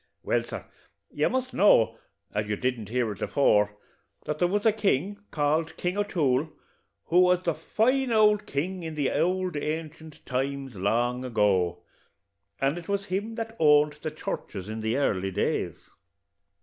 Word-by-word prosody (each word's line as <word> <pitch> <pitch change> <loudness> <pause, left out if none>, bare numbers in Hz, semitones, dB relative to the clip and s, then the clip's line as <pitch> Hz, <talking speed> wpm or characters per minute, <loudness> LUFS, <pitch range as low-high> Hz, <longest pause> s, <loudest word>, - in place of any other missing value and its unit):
Well, - - +1
sir, - - -7 0.5
you - - +1
must 260 -1 -2
know, 115 - +4 0.3
as 105 0 -2
you 105 - +1
didn't 120 -2 -2
hear 120 -2 0
it 100 - -9
afore, 105 -6 +2 0.5
that 150 0 -3
there 175 - +3
was 205 +4 -1
a 220 - +6
king, 205 -2 0
called 155 +2 0
King 180 +1 -1
O'Toole, 155 -8 +1 0.5
who 175 - +3
was 180 0 +3
a 170 - +3
fine 245 - +1
ould 210 -2 +4
king 180 +7 -2
in 160 -2 -5
the 145 -3 +1
ould 185 -1 0
ancient 155 +1 -5
times, 135 -1 -3
long 120 +6 0
ago; 100 -7 +1 0.8
and 140 +5 +1
it 170 - -13
was 200 0 -1
him 210 +4 -2
that 225 -1 -5
owned 150 -1 +5
the - - -2
churches 105 -9 -6
in 110 +1 -4
the 110 +3 -1
early 95 -9 0
days. 95 +2 -2
150 Hz, 160 wpm, -27 LUFS, 120-185 Hz, 0.8 s, a